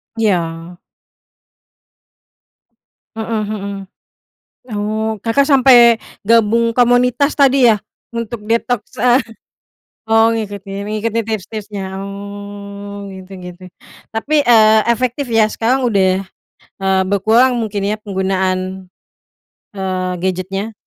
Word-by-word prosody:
Iya. 175 Hz, -5 st, -1 dB, 2.4 s
Mhm 220 Hz, -1 st, -2 dB
mhm. 200 Hz, -1 st, -5 dB, 0.9 s
Oh, 215 Hz, +1 st, -2 dB
Kakak 275 Hz, +5 st, +2 dB
sampe 245 Hz, -4 st, +6 dB, 0.3 s
gabung 230 Hz, +1 st, +3 dB
komunitas 250 Hz, +4 st, +3 dB
tadi 270 Hz, -4 st, +4 dB
ya? 210 Hz, -, -2 dB, 0.3 s
Untuk 230 Hz, -2 st, -5 dB
detoks, 230 Hz, 0 st, -2 dB
eh 250 Hz, +2 st, +4 dB, 0.9 s
oh, 225 Hz, 0 st, +4 dB
ngikutin, 200 Hz, -2 st, -5 dB
ngikutin 220 Hz, +1 st, -2 dB
tips-tipsnya, 205 Hz, -2 st, -5 dB
oh, 200 Hz, 0 st, -8 dB
gitu 190 Hz, 0 st, -11 dB
gitu. 180 Hz, 0 st, -10 dB, 0.5 s
Tapi, 290 Hz, +6 st, +1 dB
eee, 220 Hz, -2 st, +6 dB
efektif 255 Hz, +3 st, -1 dB
ya, 225 Hz, -1 st, +4 dB
sekarang 250 Hz, +4 st, 0 dB
udah, 190 Hz, -3 st, +2 dB, 0.6 s
eee, 190 Hz, 0 st, +2 dB
berkurang 220 Hz, +6 st, +3 dB
mungkin 210 Hz, -4 st, -2 dB
ya 210 Hz, -, 0 dB
penggunaan, 190 Hz, -1 st, -2 dB, 0.9 s
eee, 185 Hz, -1 st, -2 dB
gadgetnya? 190 Hz, +3 st, -3 dB
215 Hz, 95 wpm, -17 LUFS, 195-230 Hz, 2.4 s, sampe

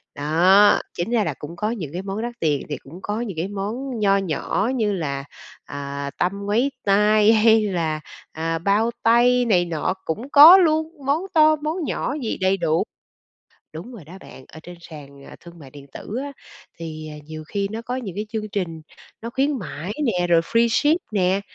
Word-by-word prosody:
đó. 180 Hz, +8 st, +4 dB
Chính 175 Hz, +7 st, -4 dB
ra 230 Hz, -3 st, +2 dB
là 160 Hz, -, -2 dB
cũng 155 Hz, +3 st, -8 dB
có 210 Hz, +5 st, -2 dB
những 165 Hz, -, -6 dB
cái 180 Hz, -, -4 dB
món 195 Hz, +2 st, -5 dB
đắt 240 Hz, +1 st, -4 dB
tiền 150 Hz, -4 st, 0 dB
thì 145 Hz, -, -3 dB
cũng 160 Hz, +8 st, -13 dB
có 210 Hz, +4 st, -3 dB
những 200 Hz, -8 st, -5 dB
cái 165 Hz, +4 st, -2 dB
món 220 Hz, +5 st, -5 dB
nho 200 Hz, -1 st, +3 dB
nhỏ 195 Hz, -, -1 dB
như 215 Hz, -4 st, 0 dB
là, 140 Hz, -7 st, -3 dB, 0.4 s
à, 140 Hz, 0 st, -6 dB
tăm 200 Hz, +3 st, -2 dB
ngoáy 235 Hz, +7 st, +1 dB
tai 210 Hz, +2 st, +4 dB
hay 220 Hz, 0 st, +5 dB
là, 165 Hz, -6 st, -1 dB, 0.3 s
à, 165 Hz, +1 st, -2 dB
bao 205 Hz, +6 st, +1 dB
tay 245 Hz, +2 st, +4 dB
này 180 Hz, -6 st, +2 dB
nọ 165 Hz, +1 st, -2 dB
cũng 225 Hz, -, -4 dB
có 310 Hz, +6 st, +10 dB
luôn, 315 Hz, -3 st, +2 dB, 0.2 s
món 285 Hz, +4 st, +1 dB
to 310 Hz, -1 st, +5 dB
món 310 Hz, +4 st, -4 dB
nhỏ 275 Hz, -, -2 dB
gì 225 Hz, -, -3 dB
đầy 190 Hz, +1 st, +2 dB
đủ. 165 Hz, -3 st, +1 dB, 0.9 s
Đúng 170 Hz, +11 st, -9 dB
rồi 205 Hz, -9 st, -11 dB
đó 160 Hz, -, -14 dB
bạn, 130 Hz, -, -13 dB
ở 160 Hz, -, -11 dB
trên 175 Hz, +1 st, -10 dB
sàn, 140 Hz, -4 st, -12 dB
à, -, -, -12 dB
thương 170 Hz, -1 st, -14 dB
mại 135 Hz, -4 st, -13 dB
điện 140 Hz, 0 st, -13 dB
tử 215 Hz, -, -7 dB
á, 285 Hz, 0 st, -6 dB, 0.5 s
thì 155 Hz, -2 st, -7 dB
nhiều 155 Hz, +1 st, -9 dB
khi 200 Hz, -1 st, -2 dB
nó 225 Hz, +1 st, -5 dB
có 245 Hz, +2 st, -4 dB
nhiều 230 Hz, -8 st, -5 dB
cái 210 Hz, +1 st, -3 dB
chương 215 Hz, -1 st, -4 dB
trình 175 Hz, -6 st, -4 dB, 0.4 s
nó 230 Hz, -, -5 dB
khuyến 275 Hz, +2 st, 0 dB
mãi 180 Hz, -1 st, -6 dB
nè, 180 Hz, -6 st, 0 dB
rồi 170 Hz, -1 st, +4 dB
freeship 235 Hz, -, +2 dB, 0.2 s
nè, 190 Hz, -1 st, +1 dB
200 Hz, 200 wpm, -22 LUFS, 165-230 Hz, 0.9 s, có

